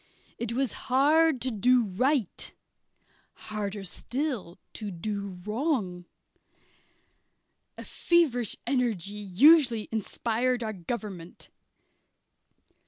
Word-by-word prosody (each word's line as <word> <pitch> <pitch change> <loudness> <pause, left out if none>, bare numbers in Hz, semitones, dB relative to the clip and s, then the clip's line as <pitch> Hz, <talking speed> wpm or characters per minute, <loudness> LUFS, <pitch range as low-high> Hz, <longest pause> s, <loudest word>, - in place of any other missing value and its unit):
It 235 0 -2
was 260 -2 0 0.2
hard 295 +3 +4
to 255 - -1
do 245 +3 +3
right; 235 - -1 0.8
harder 205 -1 -5
still 235 - -4 0.2
to 210 -2 -5
do 200 +1 -5
wrong. 210 - -1 1.7
A - - -8
feverish 280 - +1
energy 235 -7 0
usually 230 - +4
inspired 235 +3 -1
our 215 -1 -3
government. 190 -2 -7
230 Hz, 85 wpm, -28 LUFS, 200-255 Hz, 1.7 s, hard